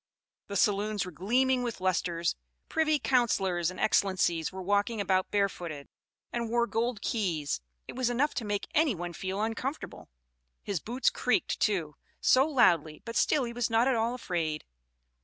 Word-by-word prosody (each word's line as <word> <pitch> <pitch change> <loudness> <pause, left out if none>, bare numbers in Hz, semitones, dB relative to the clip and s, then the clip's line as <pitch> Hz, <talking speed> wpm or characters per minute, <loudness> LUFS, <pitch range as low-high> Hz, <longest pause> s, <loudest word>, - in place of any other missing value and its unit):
The 200 - -6
saloons 205 0 +1
were 180 - -7
gleaming 250 - +1
with 240 -4 -3
lustres 175 -2 0 0.3
privy 310 -1 +2
councillors 195 - +1
and 185 - -8
excellencies 180 -6 +1
were 190 0 -7
walking 205 +4 +1
about 185 -1 +1
barefooted, 175 -8 -2 0.4
and 235 -1 -2
wore 235 +1 +2
gold 230 -1 -2
keys; 165 - -1 0.3
it - - -8
was 255 -1 0
enough 265 +5 +1
to 240 - -1
make 205 -1 -2
any 300 -7 +3
one 175 0 -5
feel 190 +4 -3
uncomfortable. 250 +6 -4 0.5
His 200 -4 -2
boots 245 - 0
creaked, - - 0
too, 170 -8 0 0.2
so 265 +3 +4
loudly, 170 - +2
but 230 0 -6
still 295 -3 +3
he 235 -1 -4
was 240 -1 -1
not 225 +2 +3
at 265 - +3
all 230 +1 0
afraid." 165 -9 -3
205 Hz, 160 wpm, -29 LUFS, 180-240 Hz, 0.5 s, so